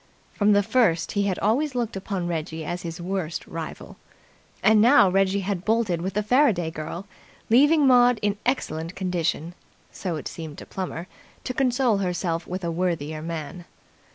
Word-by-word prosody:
From 210 0 +3
the 205 0 +4
first 210 -7 +2
he 200 -1 0
had 185 - -1
always 255 +7 +1
looked 235 -4 -2
upon 190 -2 -3
Reggie 160 -1 -4
as 175 +3 -4
his 165 0 -6
worst 175 -2 -3
rival. 165 -1 -7 0.7
And 215 -1 +6
now 230 -5 +6
Reggie 195 +1 +2
had 190 -2 -3
bolted 215 -6 +1
with 190 +2 -4
the 210 - +1
Faraday 210 - +3
girl, 160 +4 -6 0.5
leaving 290 +5 +5
Maud 245 -2 +5
in 205 -1 +1
excellent 165 - -2
condition, 175 -3 -2 0.4
so 180 -4 -4
it 150 - -5
seemed 160 -3 -8
to - - -9
Plummer, 180 -3 -5 0.4
to 255 - -3
console 250 -3 +2
herself 180 -3 -2
with 185 +1 -5
a 170 - -1
worthier 165 -3 -2
man. 165 +1 -6
185 Hz, 165 wpm, -24 LUFS, 170-220 Hz, 0.7 s, And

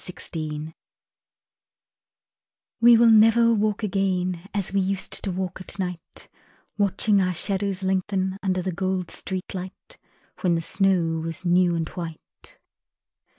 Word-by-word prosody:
Nightfall 155 -3 -5 2.1
We 235 0 +7
will 230 0 +6
never 225 +2 +6
walk 215 0 0
again 185 -2 -1
As 200 -2 -1
we 200 - +2
used 190 0 -2
to 195 - -2
walk 185 0 -4
at 185 - -7
night, 180 -3 -6 0.5
Watching 200 0 +2
our 180 -1 0
shadows 195 +1 -2
lengthen 190 0 -1
Under 185 -2 -1
the 190 - -2
gold 185 0 -2
street 185 -1 -5
light 190 - -9 0.4
When 175 -3 +2
the 165 - -1
snow 180 -3 +1
was 165 +2 -5
new 175 0 +3
and 165 -1 -2
white. 165 -3 -10
185 Hz, 130 wpm, -24 LUFS, 175-200 Hz, 2.1 s, We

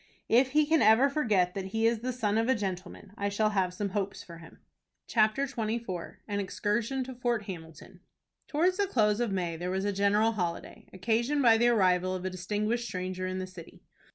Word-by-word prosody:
If 255 +3 +4
he 305 0 +4
can 320 +1 +3
ever 225 +6 +5
forget 210 -12 +1
that 195 -1 -4
he 225 +4 -1
is 230 0 +2
"the 255 +3 -3
son 220 -3 0
of 230 +2 0
a 260 - +4
gentleman," 190 -1 -5
I 200 0 -1
shall 215 +1 +1
have 190 -3 +1
some 200 +2 -3
hopes 195 0 -3
for 170 -1 -11
him. 165 -1 -14 0.5
CHAPTER 220 +4 +2
XXIV. 220 -7 -4
AN 205 -1 -2
EXCURSION 215 +6 -1
TO 260 +1 -7
FORT 240 -3 -1
HAMILTON. 170 -1 -10 0.5
Towards 355 +5 +1
the 405 -1 +1
close 215 - +2
of 240 -4 0
May 175 -4 -2
there 175 +2 -4
was 190 +1 -1
a 205 - 0
general 205 +3 +3
holiday, 175 -6 -5
occasioned 235 +9 0
by 225 -2 +6
the 240 - +4
arrival 185 -5 +2
of 185 0 -5
a 185 - -2
distinguished 210 +6 -2
stranger 185 -1 -4
in 185 0 -3
the 185 - -3
city. 185 -3 -13
210 Hz, 205 wpm, -29 LUFS, 185-235 Hz, 0.5 s, by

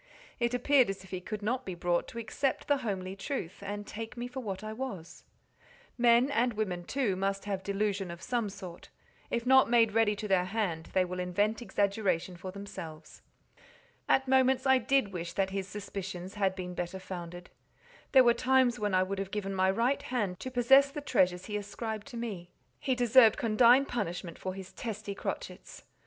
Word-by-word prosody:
It 235 0 +1
appeared 255 -1 +4
as 195 0 -5
if 190 - -15
he 185 -1 -4
could 210 +2 -6
not 250 +5 -1
be 185 -5 -5
brought 175 0 0
to - - -10
accept 235 +5 -2
the 285 - +3
homely 190 -6 -4
truth, 195 - -5
and 205 +1 -5
take 225 +3 -7
me 240 +1 -3
for 250 +2 -6
what 200 -5 -5
I 215 0 -5
was: 220 -9 -7 0.7
men, 240 +2 +4
and 245 -2 +2
women 185 -5 -2
too, 250 -6 0
must 195 +1 -2
have 195 -2 -2
delusion 200 -1 -1
of 170 0 -7
some 240 -2 -1
sort; 185 -3 -10 0.4
if 235 0 -2
not 265 0 +6
made 230 -2 +4
ready 215 -1 +3
to 210 +1 -5
their 190 -2 +3
hand, 185 -5 -2
they 185 -1 +3
will 180 0 -5
invent 205 +6 0
exaggeration 200 -5 0
for 185 +2 -7
themselves. 185 -5 -9 0.9
At 265 0 +3
moments 260 0 +3
I 265 -1 +5
did 255 -5 +1
wish 170 -1 -5
that 190 +1 0
his 195 -1 -3
suspicions 190 -2 -6
had 195 -2 0
been 180 -1 -5
better 175 +1 -4
founded. 175 -1 -8 0.6
There 260 -2 +8
were 240 -1 +5
times 255 -1 +3
when 205 -2 0
I 185 - +4
would 195 +1 -3
have 195 -1 -3
given 195 -1 -3
my 190 0 +2
right 235 +8 +1
hand 205 -8 -2
to 260 - -5
possess 265 +3 +5
the 295 +1 -6
treasures 180 -9 +1
he 210 -1 -3
ascribed 215 +2 -5
to 250 -4 -8
me. 200 -7 -5 0.3
He 260 - 0
deserved 240 -2 +6
condign 240 +4 +5
punishment 180 -8 -4
for 185 0 -4
his 190 -1 -9
testy 215 -3 -5
crotchets. - - -6
205 Hz, 190 wpm, -30 LUFS, 185-240 Hz, 0.9 s, There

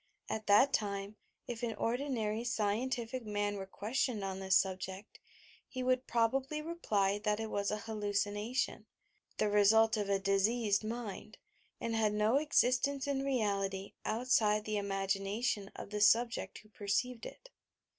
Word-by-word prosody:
At 215 0 -4
that 260 +7 +6
time, 200 0 -2 0.3
if 235 -2 -6
an 235 -2 -2
ordinary 230 -3 -1
scientific 235 +2 -1
man 205 -1 -1
were 190 -1 -6
ques 220 +7 -4
tioned 220 -6 -4
on 190 -1 -3
this 190 0 +4
subject, 190 +1 -3 0.5
he 255 -1 -4
would 255 0 +1
probably 265 +6 +1
reply 210 - 0
that 210 0 +1
it 220 -1 -4
1 200 0 -1 0.2
hallucination, 210 +2 -2 0.2
— - - -39
the - - +2
result 220 +2 +5
of 205 -1 -2
a 200 - +3
diseased 205 +2 +1
mind, 225 -1 -6 0.4
and 230 -1 -2
had 215 -2 +2
no 215 +5 +3
existence 280 -1 +2
in 280 -1 -1
reality 200 -7 -1
outside 215 -2 +2
the 215 -1 -1
imagination 195 +2 -1
of - - -8
the 210 0 -2
subject 230 +3 +3
who 215 - -21
perceived 225 +4 -2
it. - - -14
215 Hz, 145 wpm, -33 LUFS, 200-245 Hz, 0.5 s, that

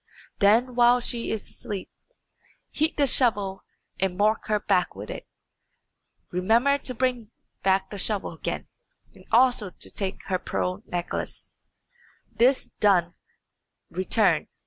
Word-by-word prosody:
Then, 225 +5 +4
while 245 0 +5
she 240 -1 -3
is 220 - -3
asleep, 200 -3 -6 0.8
heat 310 +2 0
the 290 - +4
shovel 205 -7 +1 0.4
and 185 -1 -1
mark 215 +2 +1
her 210 -1 +1
back 180 - +1
with 100 +2 -7
it. - - -8 1.0
Remember 230 +10 +3
to 255 -2 -4
bring 245 -3 -1 0.3
back 190 0 +1
the 205 - -5
shovel 200 -2 0
again, 160 - -5 0.5
and - - -16
also 240 -4 +4
to - - -12
take 195 -1 -3
her 185 -2 -1
pearl 185 +2 -2
necklace. 175 -1 -4 0.8
This 255 +3 +3
done, 180 -4 +3 0.8
return. 190 +5 +2
210 Hz, 125 wpm, -25 LUFS, 190-245 Hz, 1.0 s, while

